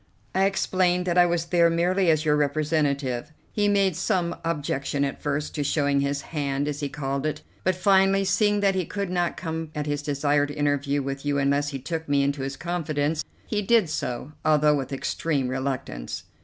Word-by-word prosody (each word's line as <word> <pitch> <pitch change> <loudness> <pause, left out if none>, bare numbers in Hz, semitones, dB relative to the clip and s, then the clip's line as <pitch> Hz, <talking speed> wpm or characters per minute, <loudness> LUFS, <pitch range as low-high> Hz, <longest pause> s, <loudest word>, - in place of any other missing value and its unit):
"I 190 +1 +3
explained 185 -2 +1
that 180 0 +2
I 175 - +6
was 170 -1 0
there 170 0 +4
merely 175 +2 +2
as 155 0 +2
your 150 -1 +4
representative. 145 -3 0 0.2
He 205 -1 +1
made 200 -3 +3
some 180 -1 0
objection 145 -3 -1
at 135 - -5
first 145 +1 -2
to 150 - -1
showing 140 -1 +1
his 140 0 -1
hand, 140 -1 -1
as 145 -1 -3
he 145 -2 -2
called 140 -1 -3
it; 150 0 -4 0.2
but 185 0 +2
finally, 195 +1 +3
seeing 205 +2 +2
that 200 -1 +3
he 190 -1 0
could 200 +2 -4
not 175 -1 0
come 160 -2 -4
at 150 -1 -2
his 145 -1 -2
desired 145 0 +1
interview 145 -1 0
with 135 0 -4
you 145 -1 0
unless 140 +1 +1
he 140 - -4
took 160 +3 -5
me 140 -1 +3
into 140 0 -1
his 135 0 -4
confidence, 155 -3 -1 0.2
he 210 -2 -1
did 205 -5 +3
so, 125 0 -3
although 150 -1 +4
with 140 -2 -2
extreme 140 0 -1
reluctance." 130 - -4
150 Hz, 190 wpm, -25 LUFS, 140-175 Hz, 0.2 s, I